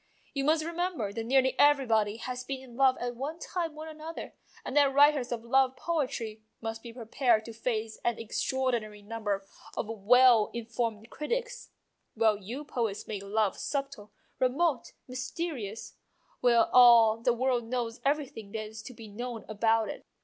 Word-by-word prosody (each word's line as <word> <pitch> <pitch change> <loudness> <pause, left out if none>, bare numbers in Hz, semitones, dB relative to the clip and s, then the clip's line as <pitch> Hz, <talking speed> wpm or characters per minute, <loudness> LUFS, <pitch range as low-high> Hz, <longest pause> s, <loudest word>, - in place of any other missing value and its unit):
You 275 -1 -1
must 310 +1 +2
remember 335 - -2
that 225 - -3
nearly 260 +1 +3
everybody 230 -8 +4
has 250 +1 -5
been 270 +1 -4
in 245 -3 -13
love 265 0 +4
at 245 0 -3
one 285 +6 -4
time 335 -3 -4
or 310 - -6
another, 315 +1 -8 0.3
and 260 - -5
that 285 -2 +5
writers 285 -2 +4
of 230 -2 -3
love 265 +1 +3
poetry 255 -10 -2 0.2
must 225 0 -5
be 235 - -9
prepared 230 -1 +1
to 230 - -8
face 225 -1 -3
an 235 -1 0
extraordinary 230 -2 -2
number 205 -2 -3 0.3
of - - -2
well 225 +1 +5
in 235 -1 -4
formed 230 -1 -3
critics. - - -3 0.5
Well, 220 -2 +3
you 235 +9 -7
poets 225 -7 -2
make 205 -3 -4
love 205 0 0
subtle, 275 -7 -4 0.3
remote, 260 +1 +1
mysterious, 255 - -5 0.4
while 235 -2 +4
all 235 -3 +8
the 230 +2 +2
world 245 -1 0
knows 235 -1 -3
everything 275 -7 -2
that 220 -1 -3
is 215 0 -9
to 250 +2 -10
be 225 -1 -10
known 235 +2 -6
about 225 +1 +2
it. - - -7
240 Hz, 165 wpm, -29 LUFS, 220-275 Hz, 0.5 s, all